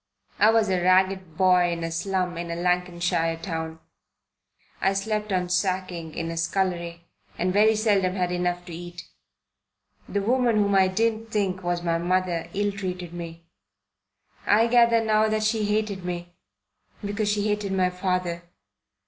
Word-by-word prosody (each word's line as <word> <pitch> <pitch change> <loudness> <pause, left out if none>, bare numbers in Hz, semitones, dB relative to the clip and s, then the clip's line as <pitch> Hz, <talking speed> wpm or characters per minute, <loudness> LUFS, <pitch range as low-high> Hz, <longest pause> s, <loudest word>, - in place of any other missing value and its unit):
I 215 - +6
was 225 -1 +3
a 185 -1 +1
ragged 185 -2 +2
boy 180 -2 +4
in 170 -1 -3
a 165 - -3
slum 180 +1 -1
in 170 0 -5
a 170 - -3
Lancashire 175 -1 0
town. 160 -1 -5 1.0
I 195 - +2
slept 210 +1 -2
on 180 -1 0
sacking 180 -3 -2
in 165 0 -3
a 165 - -5
scullery, 170 -1 -2 0.3
and 180 +1 0
very 215 +2 +5
seldom 200 -4 +1
had 180 -2 -1
enough 175 0 -1
to 175 - -9
eat. 175 +1 -9 1.0
The 200 -1 -1
woman 245 +1 +2
whom 205 -1 +2
I 190 -1 +5
didn't 225 +3 0
think 195 -4 -1
was 175 -1 -2
my 165 -1 0
mother 175 -1 -1
ill 205 +1 +1
treated 180 -3 -5
me. 170 -1 -8 1.0
I 215 +3 +5
gather 235 -1 +4
now 215 0 +3
that 215 0 0
she 215 0 +1
hated 210 -2 -1
me 175 0 -5 0.7
because 205 +1 -1
she 210 0 0
hated 210 -1 -1
my 185 -1 +1
father. 180 -2 -2
185 Hz, 155 wpm, -25 LUFS, 175-205 Hz, 1.0 s, I